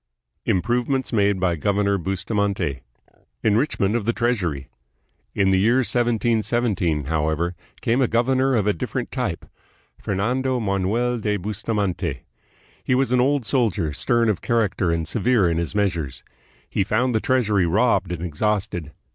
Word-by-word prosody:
Improvements 120 Hz, +7 st, 0 dB
Made 100 Hz, -3 st, +2 dB
by 90 Hz, -2 st, +1 dB
Governor 100 Hz, +3 st, +1 dB
Bustamante. 95 Hz, -, -1 dB, 0.6 s
En 110 Hz, -, +3 dB
richment 110 Hz, -5 st, +1 dB
of 115 Hz, -4 st, -1 dB
the 115 Hz, -, +1 dB
Treasury 95 Hz, -, -1 dB, 0.7 s
In 100 Hz, -1 st, +3 dB
the 95 Hz, -, +3 dB
year 115 Hz, +5 st, +3 dB
1717, 115 Hz, -, +1 dB
however, 80 Hz, +4 st, -1 dB, 0.3 s
came 120 Hz, +3 st, +1 dB
a 130 Hz, -, +3 dB
governor 130 Hz, +3 st, +2 dB
of 105 Hz, -4 st, +1 dB
a 105 Hz, -, +2 dB
different 80 Hz, -, -4 dB
type, -, -, -3 dB, 0.6 s
Fernando 125 Hz, +6 st, 0 dB
Manuel 110 Hz, +4 st, 0 dB
de 105 Hz, -1 st, 0 dB
Bustamante. 105 Hz, -1 st, -2 dB, 0.6 s
He 125 Hz, -, +1 dB
was 130 Hz, -1 st, +1 dB
an 125 Hz, -1 st, +4 dB
old 135 Hz, -1 st, +1 dB
soldier, 105 Hz, -, 0 dB
stern 120 Hz, -, +1 dB
of 105 Hz, -5 st, 0 dB
character 110 Hz, -6 st, +1 dB
and 85 Hz, -1 st, -1 dB
severe 115 Hz, +1 st, +2 dB
in 85 Hz, -1 st, 0 dB
his 85 Hz, +3 st, -3 dB
measures. 85 Hz, -11 st, -1 dB, 0.4 s
He -, -, 0 dB
found 120 Hz, +5 st, +1 dB
the 110 Hz, -, +2 dB
treasury 105 Hz, -8 st, +2 dB
robbed 100 Hz, -1 st, +2 dB
and 85 Hz, -1 st, -4 dB
exhausted. 90 Hz, -2 st, -2 dB
105 Hz, 145 wpm, -22 LUFS, 90-120 Hz, 0.7 s, an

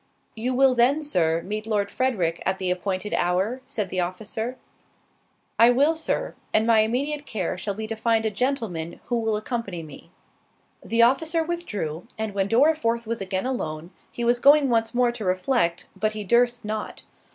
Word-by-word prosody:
"You 245 Hz, +3 st, -2 dB
will 265 Hz, 0 st, +5 dB
then, 255 Hz, +6 st, +3 dB
Sir, 165 Hz, -, +1 dB
meet 215 Hz, +2 st, -4 dB
Lord 205 Hz, -2 st, 0 dB
Frederick 190 Hz, -11 st, 0 dB
at 190 Hz, 0 st, 0 dB
the 185 Hz, -1 st, -1 dB
appointed 185 Hz, +2 st, -2 dB
hour?" 190 Hz, +9 st, 0 dB
said 215 Hz, -8 st, -2 dB
the 185 Hz, -, -2 dB
officer. 220 Hz, +7 st, -3 dB, 1.0 s
"I 230 Hz, +1 st, +8 dB
will, 285 Hz, +6 st, +3 dB
Sir; 320 Hz, -, -2 dB, 0.2 s
and 220 Hz, -, +4 dB
my 230 Hz, -1 st, +5 dB
immediate 280 Hz, +7 st, 0 dB
care 190 Hz, -6 st, -2 dB
shall 195 Hz, +2 st, -4 dB
be 220 Hz, +1 st, -4 dB
to 225 Hz, +1 st, -4 dB
find 225 Hz, 0 st, +1 dB
a 220 Hz, -, +1 dB
gentleman 210 Hz, -, -2 dB
who 240 Hz, -1 st, -1 dB
will 220 Hz, -2 st, 0 dB
accompany 210 Hz, -6 st, -4 dB
me." 150 Hz, -3 st, -12 dB, 0.7 s
The 230 Hz, +2 st, +3 dB
officer 320 Hz, +7 st, +2 dB
withdrew, 210 Hz, -, -4 dB
and 220 Hz, -2 st, -3 dB
when 195 Hz, -1 st, 0 dB
Dorriforth 235 Hz, -3 st, +2 dB
was 230 Hz, -1 st, -3 dB
again 190 Hz, +1 st, -2 dB
alone, 170 Hz, -10 st, -4 dB, 0.2 s
he 240 Hz, -, -5 dB
was 240 Hz, +1 st, +2 dB
going 285 Hz, +1 st, +6 dB
once 225 Hz, -1 st, +1 dB
more 245 Hz, -1 st, +3 dB
to 240 Hz, -2 st, -6 dB
reflect, 185 Hz, -1 st, 0 dB
but 215 Hz, +2 st, -1 dB
he 215 Hz, -1 st, -4 dB
durst 240 Hz, +3 st, +2 dB
not. 215 Hz, 0 st, -5 dB
220 Hz, 175 wpm, -24 LUFS, 190-250 Hz, 1.0 s, I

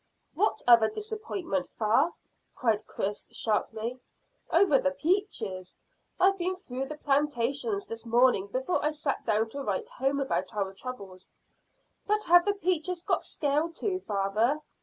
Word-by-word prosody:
"What 405 Hz, +7 st, 0 dB
other 230 Hz, -2 st, +7 dB
disappointment, 405 Hz, -, -4 dB
fa?" 225 Hz, +10 st, +3 dB, 0.4 s
cried 225 Hz, -4 st, 0 dB
Chris 205 Hz, +1 st, -3 dB
sharply. 225 Hz, +2 st, -2 dB, 0.5 s
"Over 335 Hz, -5 st, +5 dB
the 280 Hz, -, +2 dB
peaches. 275 Hz, -, -2 dB, 0.4 s
I've 390 Hz, +1 st, +4 dB
been 365 Hz, +2 st, 0 dB
through 270 Hz, -7 st, -5 dB
the 305 Hz, +1 st, -7 dB
plantations 290 Hz, -, 0 dB
this 230 Hz, -8 st, -7 dB
morning 235 Hz, -4 st, +3 dB
before 260 Hz, -, -1 dB
I 300 Hz, -, +3 dB
sat 300 Hz, -2 st, -2 dB
down 220 Hz, +1 st, +2 dB
to 280 Hz, +5 st, -5 dB
write 455 Hz, -, -2 dB
home 280 Hz, -, -1 dB
about 240 Hz, -8 st, -2 dB
our 195 Hz, -2 st, -1 dB
troubles." 195 Hz, -5 st, -8 dB, 0.8 s
"But 425 Hz, +1 st, +2 dB
have 350 Hz, 0 st, +6 dB
the 410 Hz, 0 st, +1 dB
peaches 360 Hz, -2 st, -1 dB
got -, -, 0 dB
scale 295 Hz, +2 st, 0 dB
too, 370 Hz, +2 st, -2 dB
father?" 215 Hz, -, 0 dB
275 Hz, 140 wpm, -28 LUFS, 225-360 Hz, 0.8 s, other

